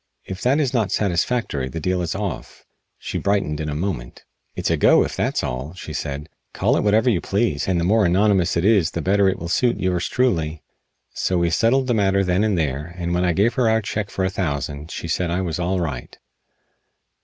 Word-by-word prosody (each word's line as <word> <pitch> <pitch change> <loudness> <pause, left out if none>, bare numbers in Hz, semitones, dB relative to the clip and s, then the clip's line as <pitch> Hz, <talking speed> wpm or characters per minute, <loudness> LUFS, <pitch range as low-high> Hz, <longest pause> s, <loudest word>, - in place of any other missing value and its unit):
If 95 0 -7
that 135 +4 +2
is 135 -4 0
not 110 -6 +1
satisfactory 90 - 0
the 75 - -5
deal 90 +2 -1
is 85 - -2
off." 100 -4 -5 0.3
She - - -4
brightened 100 -7 0
in 75 -1 -3
a 75 - -3
moment. 75 -8 -4 0.3
"It's - - -1
a - - +3
go, - - +5
if - - -4
that's - - -1
all," 65 +8 -4
she 80 -4 -8
said. 75 0 -4 0.3
"Call - - +2
it - - +1
whatever 110 +3 +2
you 105 -8 +2
please, 100 -7 0
and 90 -2 +1
the - - 0
more 105 +5 +3
anonymous 95 -1 +2
it 85 - 0
is 100 -7 +4
the 85 - -4
better 100 +2 +3
it 95 - -2
will 85 - -6
suit 120 +7 +1
yours 90 -1 0
truly." 85 -11 0 0.5
So 90 - 0
we 85 -1 +1
settled 120 +9 +2
the 125 - +1
matter 100 -2 +2
then 90 +2 +1
and 105 -4 +1
there, 75 +2 -2
and 85 -1 -2
when 90 +1 +1
I 90 -1 +2
gave 105 +7 +2
her 120 -2 +2
our 110 0 +2
check 105 -1 -3
for 95 - -2
a 95 - -1
thousand 75 -4 -3
she 85 - -6
said 85 +2 -1
I 90 +2 0
was 85 -3 -3
all 90 +2 0
right. 75 -8 -5
90 Hz, 225 wpm, -22 LUFS, 80-105 Hz, 0.5 s, go